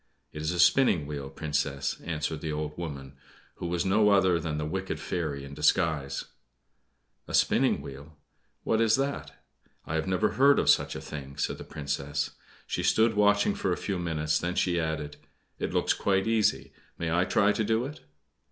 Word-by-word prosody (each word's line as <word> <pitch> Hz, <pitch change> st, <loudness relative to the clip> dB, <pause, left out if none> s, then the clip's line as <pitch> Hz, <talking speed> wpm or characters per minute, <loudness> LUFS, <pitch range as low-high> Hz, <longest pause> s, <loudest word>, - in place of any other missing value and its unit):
"It 75 Hz, -, -6 dB
is 80 Hz, +2 st, -1 dB
a 90 Hz, -, -3 dB
spinning 90 Hz, -, +4 dB
wheel, 70 Hz, -2 st, -5 dB
Princess," 70 Hz, -2 st, -2 dB
answered 80 Hz, -1 st, -3 dB
the 80 Hz, -, -3 dB
old 75 Hz, 0 st, -4 dB
woman, 70 Hz, -5 st, -6 dB, 0.4 s
who 85 Hz, -, -4 dB
was 85 Hz, +1 st, -1 dB
no 105 Hz, +2 st, +4 dB
other 95 Hz, -4 st, +4 dB
than 80 Hz, -2 st, -3 dB
the 75 Hz, -, -2 dB
wicked 95 Hz, +4 st, -3 dB
fairy 80 Hz, -6 st, -3 dB
in 70 Hz, -, -10 dB
disguise. 75 Hz, -2 st, +1 dB, 1.0 s
"A -, -, -2 dB
spinning -, -, +3 dB
wheel 70 Hz, +3 st, -10 dB, 0.5 s
what 110 Hz, 0 st, +1 dB
is 115 Hz, -1 st, +4 dB
that? 135 Hz, -, -4 dB, 0.4 s
I -, -, -5 dB
have 80 Hz, +1 st, -1 dB
never 95 Hz, +3 st, +2 dB
heard 140 Hz, +2 st, +4 dB
of -, -, +5 dB
such -, -, +1 dB
a -, -, -5 dB
thing," 70 Hz, -2 st, -8 dB
said -, -, -2 dB
the -, -, -7 dB
Princess. 70 Hz, 0 st, -3 dB, 0.3 s
She -, -, -2 dB
stood 110 Hz, +1 st, +3 dB
watching 105 Hz, -, +3 dB
for 205 Hz, 0 st, -1 dB
a -, -, 0 dB
few 95 Hz, -3 st, -3 dB
minutes, 75 Hz, -3 st, 0 dB
then 90 Hz, +1 st, -2 dB
she 85 Hz, -2 st, +1 dB
added: 80 Hz, -2 st, -3 dB, 0.4 s
"It -, -, -2 dB
looks -, -, +2 dB
quite 95 Hz, -1 st, +1 dB
easy. 105 Hz, -12 st, +1 dB, 0.2 s
May 80 Hz, -1 st, -2 dB
I 85 Hz, +1 st, +3 dB
try 100 Hz, +2 st, +3 dB
to 110 Hz, -, 0 dB
do 110 Hz, +3 st, +1 dB
it?" 145 Hz, +3 st, -8 dB
80 Hz, 185 wpm, -28 LUFS, 75-100 Hz, 1.0 s, of